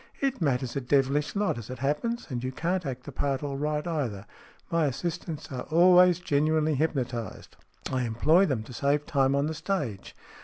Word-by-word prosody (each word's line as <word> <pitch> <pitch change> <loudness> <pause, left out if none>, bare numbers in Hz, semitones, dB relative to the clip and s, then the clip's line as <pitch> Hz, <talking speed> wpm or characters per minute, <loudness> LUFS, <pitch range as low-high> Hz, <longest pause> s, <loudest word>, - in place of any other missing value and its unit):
" - - -29
It 270 -5 -1
matters 130 -4 0
a 140 - -1
devilish 140 +4 +1
lot, 200 - 0
as 115 - -10
it 130 - -6
happens. 150 - -1
And 120 -1 -3
you 130 - -2
can't 175 +4 -2
act 130 -1 -5
the 145 - -8
part 135 +1 -1
all 140 -1 -3
right, 150 +1 -1
either. 130 - -3 0.5
My 165 -2 +2
assistants 160 +2 -4
are 130 - -5
always 180 +1 +6
genuinely 155 -1 +1
hypnotized. 130 - -3 0.4
I 130 - 0
employ 155 - +3
them 125 -8 -1
to 125 - -11
save 140 +4 +1
time 140 -3 +2
on 140 +1 +1
the 160 - -2
stage. 155 - -3
145 Hz, 190 wpm, -27 LUFS, 130-165 Hz, 0.5 s, always